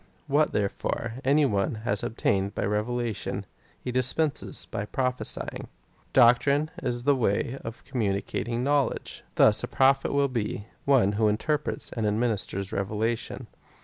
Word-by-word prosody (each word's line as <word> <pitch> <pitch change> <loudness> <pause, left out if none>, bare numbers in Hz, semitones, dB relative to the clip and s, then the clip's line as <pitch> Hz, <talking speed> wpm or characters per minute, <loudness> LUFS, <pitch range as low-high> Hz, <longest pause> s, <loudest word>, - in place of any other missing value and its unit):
What, 150 +1 +2
therefore, 105 +2 -2
any 145 +3 +4
one 100 -4 0
has 100 -3 0
ob 115 - -4
tained 100 0 +1
by - - -1
revelation, 110 +2 -2 0.3
he 125 - -5
dispenses 130 +5 +1
by 100 - -5
j^rophesying. 125 +1 -3 0.4
Doctrine 140 +5 +4
is 120 -2 -2
the 140 +1 +4
way 120 +2 0
of 115 +1 -8
communicating 115 0 -2
knowledge. 140 0 0
Thus - - +5
a - - -2
Prophet 135 0 +3
will 140 0 +2
be 110 -5 -3
— - - -37
one 130 -8 +4
who 105 +1 +2
interprets 145 +8 -1
and 110 -3 -1
administers 105 -3 -1
revelation. 110 +4 -2
120 Hz, 140 wpm, -27 LUFS, 105-135 Hz, 0.4 s, Thus